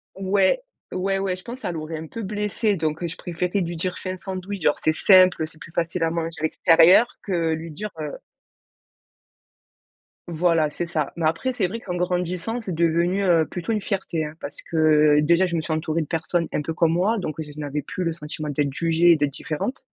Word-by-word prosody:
Ouais. 195 Hz, -, +2 dB, 0.3 s
Ouais, 195 Hz, +1 st, 0 dB
ouais. 195 Hz, -1 st, -1 dB
Je 185 Hz, -, -13 dB
pense 245 Hz, +2 st, -7 dB
ça 180 Hz, -, -3 dB
l'aurait 160 Hz, 0 st, -5 dB
un 160 Hz, -, -6 dB
peu 230 Hz, -, -7 dB
blessée. 210 Hz, +1 st, -1 dB
Donc, 155 Hz, 0 st, -2 dB
heu, 170 Hz, -, -1 dB
je 165 Hz, -, -7 dB
préférais 180 Hz, +3 st, -2 dB
lui 170 Hz, -1 st, -3 dB
dire: 180 Hz, +2 st, -3 dB
«Fais 185 Hz, -, -4 dB
un 185 Hz, -, -5 dB
sandwich, 190 Hz, +1 st, -6 dB
genre 150 Hz, -2 st, +2 dB
c'est 155 Hz, -, +3 dB
simple, 185 Hz, -4 st, +5 dB
c'est 155 Hz, -, -13 dB
plus 165 Hz, -, -11 dB
facile 170 Hz, 0 st, -1 dB
à 165 Hz, -, +1 dB
manger 165 Hz, 0 st, -3 dB
à 155 Hz, -, -7 dB
l'extérieur», 165 Hz, +7 st, +6 dB, 0.2 s
que 170 Hz, -5 st, 0 dB
lui 160 Hz, 0 st, -5 dB
dire, 210 Hz, +7 st, -5 dB
heu 150 Hz, -2 st, -4 dB, 2.1 s
Voilà, 165 Hz, -2 st, +2 dB
c'est 170 Hz, +3 st, -4 dB
ça. 155 Hz, -4 st, -2 dB
Mais 165 Hz, -, -1 dB
après, 165 Hz, +12 st, 0 dB
c'est 215 Hz, -7 st, 0 dB
vrai 230 Hz, +5 st, -6 dB
qu'en 180 Hz, -2 st, -4 dB
grandissant, 180 Hz, +5 st, -1 dB
c'est 190 Hz, -5 st, -4 dB
devenu, 170 Hz, +4 st, +1 dB
heu, 165 Hz, -3 st, +4 dB
plutôt 180 Hz, +5 st, -3 dB
une 210 Hz, -, -1 dB
fierté, 190 Hz, -6 st, -2 dB
hein. 150 Hz, +1 st, -8 dB
Parce 145 Hz, -, -8 dB
que, 155 Hz, -2 st, +4 dB
déjà, 170 Hz, +5 st, +4 dB
je 170 Hz, -, -2 dB
me -, -, 0 dB
suis 155 Hz, 0 st, -3 dB
entourée 160 Hz, +1 st, -1 dB
de 150 Hz, -, -4 dB
personnes 170 Hz, 0 st, -1 dB
un -, -, 0 dB
peu 160 Hz, +2 st, -4 dB
comme 165 Hz, 0 st, +2 dB
moi, 200 Hz, +7 st, +2 dB
donc 155 Hz, -7 st, -3 dB
j 150 Hz, -1 st, -8 dB
je 150 Hz, -, -11 dB
n'avais 145 Hz, 0 st, -3 dB
plus 180 Hz, +6 st, -4 dB
le 165 Hz, -, 0 dB
sentiment 155 Hz, -1 st, -6 dB
d'être 145 Hz, -1 st, 0 dB
jugée 165 Hz, +2 st, +3 dB
et 170 Hz, -, +7 dB
d'être 145 Hz, -2 st, 0 dB
différente. 155 Hz, -, -4 dB
170 Hz, 220 wpm, -23 LUFS, 155-185 Hz, 2.1 s, et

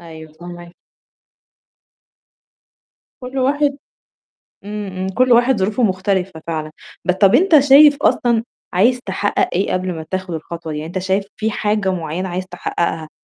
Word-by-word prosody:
أيوه 160 Hz, -2 st, -12 dB
فهماك. 175 Hz, +1 st, -11 dB, 2.5 s
كل 255 Hz, +2 st, -5 dB
واحد 280 Hz, +2 st, +1 dB, 0.9 s
إمم، 210 Hz, 0 st, -5 dB
إمم. 185 Hz, 0 st, -4 dB
كل 250 Hz, +6 st, +1 dB
واحد 240 Hz, +1 st, +4 dB
ظروفه 210 Hz, +6 st, 0 dB
مختلفة 190 Hz, -3 st, -1 dB
فعلًا، 155 Hz, -2 st, -4 dB, 0.3 s
بس 180 Hz, -, +1 dB
طَب 195 Hz, +2 st, +4 dB
أنت 320 Hz, +1 st, +5 dB
شايف 285 Hz, +1 st, +7 dB
أصلًا 235 Hz, -5 st, +2 dB, 0.3 s
عايز 235 Hz, +8 st, +3 dB
تحقّق 195 Hz, +1 st, 0 dB
إيه 190 Hz, +3 st, 0 dB
قبل 185 Hz, 0 st, -2 dB
ما 160 Hz, -1 st, -7 dB
تاخد 185 Hz, -2 st, -3 dB
الخطوة 165 Hz, 0 st, -6 dB
دي؟ 150 Hz, -, -4 dB
يعني 155 Hz, +1 st, -5 dB
أنت 180 Hz, +3 st, -4 dB
شايف 190 Hz, +2 st, -1 dB
في 220 Hz, +1 st, -1 dB
حاجة 210 Hz, -2 st, 0 dB
معيّنة 175 Hz, +1 st, -4 dB
عايز 180 Hz, +1 st, -4 dB
تحقّقها 170 Hz, -3 st, -3 dB
190 Hz, 145 wpm, -18 LUFS, 175-235 Hz, 2.5 s, شايف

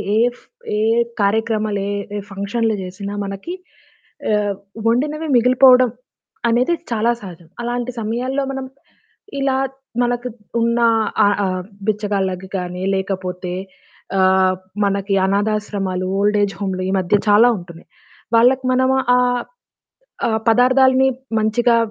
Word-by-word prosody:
ఏ -, -, +3 dB, 0.2 s
ఫ్ -, -, -23 dB, 0.3 s
ఏ -, -, +1 dB, 0.4 s
కార్యక్రమాలు 215 Hz, 0 st, 0 dB
ఏ -, -, -2 dB, 0.3 s
ఏ -, -, -2 dB
ఫంక్షన్లు 210 Hz, +3 st, -1 dB
చేసినా 200 Hz, +2 st, -6 dB
మనకి 195 Hz, -, -6 dB, 0.8 s
ఆహ్, 205 Hz, -1 st, +1 dB, 0.3 s
వండినవి 300 Hz, +7 st, 0 dB
మిగిలిపోవడం 250 Hz, +1 st, +6 dB, 0.6 s
అనేది 245 Hz, +8 st, +2 dB, 0.2 s
చాలా 230 Hz, +1 st, +2 dB
సహజం. 175 Hz, -4 st, -11 dB
అలాంటి 240 Hz, +1 st, -2 dB
సమయాల్లో 245 Hz, +5 st, -2 dB
మనం 270 Hz, -1 st, -4 dB, 0.7 s
ఇలా 270 Hz, -1 st, +1 dB, 0.5 s
మనకు 245 Hz, 0 st, -1 dB, 0.3 s
ఉన్న 235 Hz, +1 st, +1 dB, 0.5 s
ఆహ్, 205 Hz, 0 st, +2 dB
ఆహ్, 185 Hz, -1 st, -2 dB, 0.2 s
బిచ్చగాళ్ళకి 195 Hz, -3 st, -1 dB
గాని, 180 Hz, 0 st, -4 dB
లేకపోతే 185 Hz, -2 st, -3 dB, 0.7 s
ఆహ్, 185 Hz, 0 st, +4 dB, 0.3 s
మనకి 200 Hz, 0 st, -1 dB
అనాధాశ్రమాలు, 200 Hz, -2 st, -1 dB
ఓల్డ్ 210 Hz, +1 st, +2 dB
ఏజ్ 195 Hz, -2 st, -2 dB
హోములు 185 Hz, -2 st, -2 dB
ఈ -, -, 0 dB
మధ్య 185 Hz, +3 st, +2 dB
చాలా 215 Hz, +4 st, +7 dB
ఉంటున్నాయి. 170 Hz, -2 st, -12 dB, 0.5 s
వాళ్ళకి 255 Hz, +3 st, +4 dB
మనము 260 Hz, +1 st, +2 dB, 0.2 s
ఆహ్, 245 Hz, -1 st, +2 dB, 0.9 s
ఆ -, -, +1 dB, 0.2 s
పదార్థాలని 260 Hz, +2 st, +5 dB, 0.3 s
మంచిగా 230 Hz, +2 st, +2 dB
215 Hz, 115 wpm, -19 LUFS, 195-245 Hz, 0.9 s, చాలా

